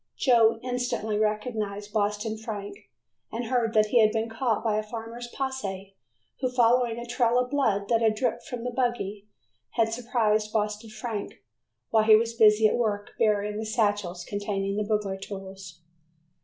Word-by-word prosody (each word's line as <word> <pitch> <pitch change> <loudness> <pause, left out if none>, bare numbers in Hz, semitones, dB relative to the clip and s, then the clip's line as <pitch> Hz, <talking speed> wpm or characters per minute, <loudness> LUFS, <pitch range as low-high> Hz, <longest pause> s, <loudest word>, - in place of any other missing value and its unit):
Joe 230 -3 +4
instantly 245 -4 -2
recognized 210 -1 -2
Boston 210 +1 0
Frank, 220 - -7 0.4
and 235 +2 -3
heard 230 -2 0
that 215 0 +4
he 240 - +4
had 215 -1 +5
been 225 +1 -1
caught 225 0 -1
by 215 -2 +1
a - - 0
farmer's 230 +2 -7
posse, 200 -8 -5 0.4
who, 255 - 0
following 240 -1 +3
a 235 - -5
trail 240 0 +1
of 250 +1 0
blood 220 -9 +1
that 230 -1 +3
had 220 -1 +3
dripped 240 +1 -2
from 245 -2 -5
the 250 - -2
buggy, 235 -5 -2 0.5
had 225 0 +1
surprised 220 -3 0
Boston 210 0 -2
Frank 215 -1 -6 0.5
while 220 - +5
he 220 -1 +8
was 230 +1 +1
busy 215 -1 +6
at - - 0
work 210 -4 -1
burying 210 -1 +1
the 220 - -3
satchels 205 -5 -1
containing 200 -1 -2
the 210 - 0
burglar 210 -2 -1
tools. 190 -3 -9
220 Hz, 165 wpm, -27 LUFS, 210-235 Hz, 0.5 s, he